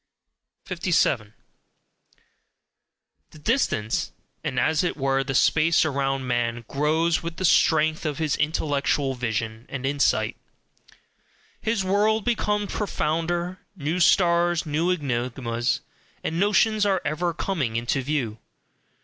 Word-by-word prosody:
57. 170 - 0 1.9
The - - -15
distance, 150 - 0 0.3
and 130 - -1
as 155 +6 +2
it 175 - -1
were 135 -1 +1
the 135 0 -3
space 160 +4 +4
around 135 -2 -1
man, 120 -1 -1
grows 155 +4 +1
with 170 0 -5
the 185 - -1
strength 160 -1 +3
of 150 -3 -2
his 155 -3 0
intellectual 145 -2 0
vision 115 -1 -3
and 135 -1 -5
insight: 140 +1 +1 1.2
his 220 -4 0
world 210 +3 +2
becomes 210 -3 0
profounder; 175 -1 -1 0.2
new 160 +1 -2
stars, 175 -1 +3
new 155 +3 0
enigmas, 125 -6 -1 0.4
and 165 +1 -2
notions 210 +2 +3
are 195 -2 +2
ever 165 +4 0
coming 160 - -2
into 120 +4 0
view. 125 -6 -2
155 Hz, 115 wpm, -24 LUFS, 135-175 Hz, 1.9 s, space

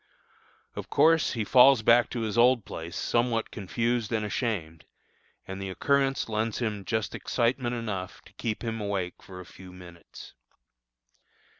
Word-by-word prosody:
Of - - -7
course, 165 0 +3
he 115 - -2
falls 125 +2 +6
back 120 +2 +5
to 120 - -4
his 110 -1 -3
old 120 -1 +4
place 85 +1 -7
somewhat 115 +3 0
confused 115 +3 -2
and 110 -2 0
ashamed, 100 -8 -3 0.6
and 95 0 -6
the 95 - -4
occurrence 135 +6 +1
lends 110 0 -2
him 105 -5 -3
just 110 -3 -2
excitement 120 0 -1
enough 100 -6 -5
to 95 - -19
keep 110 +1 -4
him 115 -1 -3
awake 95 -3 -3
for 90 -1 -11
a 90 - -9
few 90 +1 -13
minutes. 90 -2 -13
110 Hz, 150 wpm, -27 LUFS, 95-120 Hz, 0.6 s, falls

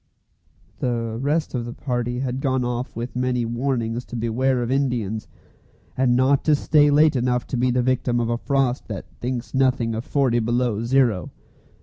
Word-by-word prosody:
The 115 -2 -2
rest 150 +3 0
of 125 -3 -1
the 120 - -6
party 125 -1 -2
had 130 0 -2
gone 130 -2 0
off 120 +1 -3
with 120 +2 -5
many 125 -1 0
warnings 120 -1 -2
to - - -8
beware 120 +2 0
of 120 - -3
Indians, 120 -6 -1 0.7
and 125 -1 +2
not 130 +2 +3
to 155 - +5
stay 145 0 +4
late 150 +1 +4
enough 125 0 0
to - - -4
be 125 +1 +2
the 125 0 +1
victim 125 -1 +1
of 120 - 0
a 120 0 -1
frost 135 -2 0
that 100 -5 -6
thinks 125 0 -4
nothing 130 -4 +2
of 110 +1 -3
forty 130 -4 +1
below 120 -1 0
zero. 120 -8 +2
125 Hz, 180 wpm, -23 LUFS, 120-130 Hz, 0.7 s, to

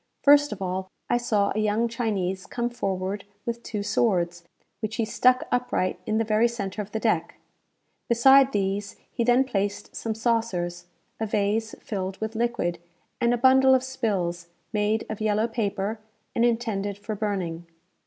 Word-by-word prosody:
First 290 0 +6
of 195 - -4
all, 185 +1 -3 0.2
I 240 - +4
saw 215 -4 +1
a 215 - -1
young 215 +2 +2
Chinese 200 -5 -2
come 240 0 -2
forward 195 -2 -2 0.2
with 235 0 -3
two 210 -3 -4
swords, 175 -6 +1 0.4
which 215 0 -3
he 230 - 0
stuck 255 +3 +3
upright 245 -7 0
in 215 - +1
the 225 - +2
very 220 +1 +3
centre 210 -3 -4
of 205 0 -8
the 220 - -2
deck. 175 -7 0 0.7
Beside 265 +3 +6
these 200 -1 -1 0.2
he 235 - -1
then 245 +2 +4
placed 205 -5 -3
some 225 -1 -3
saucers, 195 -7 -1 0.3
a 220 - -1
vase 210 +2 0
filled 190 -2 -4
with 220 0 -3
liquid, 220 -7 -1 0.4
and 235 - +3
a 245 - +2
bundle 265 +1 +6
of 255 - +1
spills, 190 -10 -2 0.3
made 210 +1 +1
of 215 -1 -6
yellow 215 +1 +2
paper, 210 -1 -2 0.3
and 235 - +3
intended 220 -4 -1
for 210 +2 -5
burning. 185 -5 -3
215 Hz, 165 wpm, -26 LUFS, 195-235 Hz, 0.7 s, First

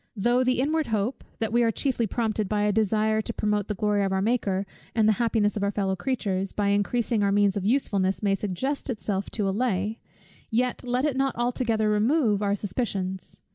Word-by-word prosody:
Though 240 +5 +2
the 255 -1 +1
inward 305 +3 +1
hope, 220 +3 -1
that 225 0 -2
we 240 - +4
are 230 - +3
chiefly 235 0 0
prompted 215 -2 -1
by 210 -1 +1
a 210 - +3
desire 215 +1 +2
to 230 - -4
promote 210 -2 0
the 210 - -2
glory 205 0 +1
of 195 - 0
our 190 - +1
Maker, 200 -3 0 0.3
and 220 -2 +4
the - - +6
happiness 220 -3 +1
of 210 - -2
our 200 - +1
fellow 195 -2 -1
creatures, 195 -4 -2
by 205 -1 0
increasing 215 +3 +1
our 200 -1 +2
means 200 -1 +3
of 195 -2 -2
usefulness, 200 -6 +1
may 200 -1 +3
suggest 210 +10 -2
itself 205 -4 -2
to 205 -3 -1
allay, 210 0 -1 0.5
yet 245 +3 0
let 250 +2 0
it 295 -4 0
not 270 -1 0
altogether 235 -2 0
remove, 210 0 +2
our 200 -1 +1
suspicions. 190 -3 -4
215 Hz, 200 wpm, -26 LUFS, 200-240 Hz, 0.5 s, the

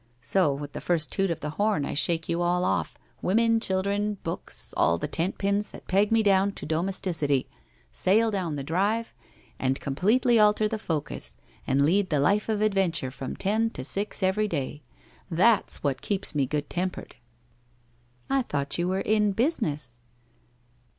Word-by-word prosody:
So, 170 +4 +2
with 145 +1 -6
the - - -6
first 165 -4 0
toot 195 -1 +1
of 165 -2 -3
the 150 - -3
horn 205 -9 +2
I - - -3
shake 165 +2 +1
you 170 +1 -1
all 180 +1 +1
off 85 -4 -1
— - - -36
women, 230 +4 +3
chil 190 -3 0
dren, 205 +1 -1
books, 165 - -7
all 85 0 +3
the - - -3
tent 170 +4 0
pins 200 +1 0
that - - -12
peg 200 +3 +2
me 225 -1 +4
down 195 -1 +3
to - - -7
domes 170 +5 -1
ticity 145 -7 0 0.3
— - - -35 0.2
sail 220 - +3
down 180 -7 -2
the 140 - -4
drive, 205 +9 0 0.5
and 130 0 0
completely 225 - +2
alter 210 0 +4
the 220 0 -3
focus, 155 -6 -4 0.3
and 140 +2 +3
lead 190 +5 +2
the 150 - +1
life 200 +10 +2
of 215 -1 0
adventure 190 -10 +1
from 135 0 -6
ten 220 +3 +1
to 130 - -7
six 200 +7 -3
every 200 +3 +2
day. 145 -4 -3 0.5
That's 195 +5 +2
what 135 -3 -1
keeps 200 -2 -1
me 140 -3 +1
good 150 +1 -2
tempered.' 185 +1 -4 0.6
' 120 0 -37 0.3
I 270 0 +2
thought 145 - -2
you 175 - +1
were 190 +1 0
in 210 -1 +2
Business 155 - -1
185 Hz, 185 wpm, -26 LUFS, 150-210 Hz, 0.6 s, me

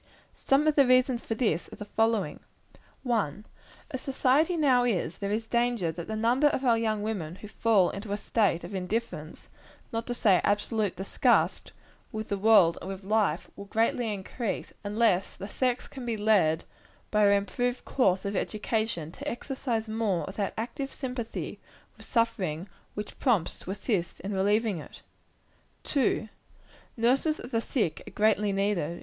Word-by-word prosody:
Some 275 +3 +2
of 310 - +4
the 280 -3 +5
reasons 255 -1 +4
for 225 - -3
this 215 -8 0
are - - -8
the 210 - -8
following: 225 0 0 0.6
1. 215 - -1 0.5
As 260 - -4
society 280 +6 +2
now 260 -5 +4
is, 185 -8 -1
there 200 0 -2
is 220 +2 -1
danger 235 -6 +1
that 170 0 -7
the 220 - -3
number 240 +6 +3
of 275 -2 0
our 235 -2 +5
young 220 -2 0
women 185 -7 -3
who 210 - -10
fall 210 -3 +3
into 200 +1 -6
a 205 - 0
state 205 -6 +1
of 175 +4 -7
indifference, 185 -4 -4 0.4
not 230 0 -3
to 245 - -2
say 195 -6 +4
absolute 205 -1 0
disgust, 190 - +1 0.4
with 220 0 -5
the 200 - 0
world 195 -6 +5
and 190 - -6
with 195 0 -6
life, 200 -5 +1
will 200 - -8
greatly 225 +2 +1
increase, 205 +3 -4
unless 205 -2 +1
the 195 - -7
sex 250 +3 -1
can 265 - -9
be 235 -2 -2
led, 205 -7 +3 0.5
by 210 -1 +4
an 200 - +5
improved 245 +5 -1
course 190 -8 +2
of 200 +1 -2
education, 215 -6 -1
to 285 +10 -8
exercise 240 -3 -3
more 215 -5 0
of 190 - -7
that 200 -2 -2
active 245 +5 -4
sympathy 250 -4 -5 0.4
with - - -13
suffering 190 -8 0 0.3
which 210 0 -6
prompts 210 -10 +1
to - - -10
assist 195 -3 -2
in 200 +3 -4
relieving 205 0 +1
it. - - -12 0.8
2. 260 -5 +1 0.7
Nurses 265 +7 +2
of 245 - -8
the 230 - +1
sick 220 - -1
are - - -8
greatly 210 -1 +2
needed. 195 -4 0
215 Hz, 165 wpm, -28 LUFS, 195-240 Hz, 0.8 s, the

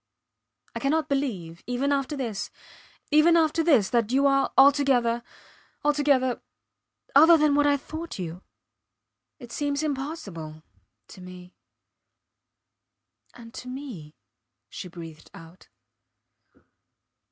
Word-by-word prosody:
I - - -4
cannot 305 +3 0
believe 195 -13 -3
even 250 +3 -1
after 280 +1 -1
this 230 -7 -4 0.6
even 315 +3 +5
after 325 0 +2
this 265 - +3
that 235 -2 +1
you 275 +2 +2
are 275 0 +2
altogether 270 -4 +4 0.6
altogether... 285 -4 +2 0.7
other 320 +4 +7
than 300 -2 +3
what 290 0 +3
I 285 0 +3
thought 315 +4 -8
you. 175 -1 -6 1.0
It 245 -4 -12
seems 285 +3 -2
impossible 260 - -5 0.5
to 185 - -13
me. 180 0 -12 1.8
And 230 -1 -13
to 250 - -9
me, 250 - -8 0.6
she - - -7
breathed 165 -3 -11
out. 165 +3 -15
265 Hz, 105 wpm, -25 LUFS, 190-290 Hz, 1.8 s, other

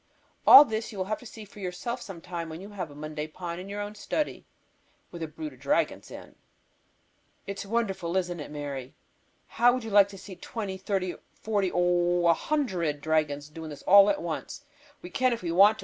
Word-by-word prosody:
All 290 - +12
this 220 -2 -3
you 210 - -9
will 185 - -1
have 215 +2 -2
to 245 - -11
see 220 -1 -10
for 205 +1 -15
yourself 200 +7 -4
some 190 -7 -9
time 170 -2 -5
when 160 +1 -7
you 195 +2 -9
have 185 -6 -5
a 145 - -13
Monday 155 +1 -5
Pond 170 +2 -6
in 190 - -9
your 205 +1 -4
own 205 0 -5
study, 300 +8 -3 0.6
with 170 - -8
a 160 - -2
brood 305 - -7
of - - -18
dragons - - 0
in. - - -11 1.1
"It 200 0 -5
is - - -6
wonderful, 195 -6 -1
isn't 175 -2 -2
it, 150 - -7
Mary? 140 -3 -6 0.5
How 245 +1 +3
would 255 - -4
you 225 - -6
like 200 -1 +6
to 200 - -10
see 190 0 -10
twenty, 190 +1 -5
thirty, 190 -2 -1 0.2
forty, 205 -4 -1
oh, 175 0 +2
a 170 - +6
hundred 180 - -1
dragons 150 -2 0
doing 160 +1 -8
this 145 -2 -10
all 200 +1 +8
at 195 - 0
once. 170 - -5 0.4
We 180 - -8
can 255 -2 +2
if 230 - -5
we 170 - -1
want 200 +5 +6
to. - - -23
185 Hz, 215 wpm, -28 LUFS, 165-210 Hz, 1.1 s, All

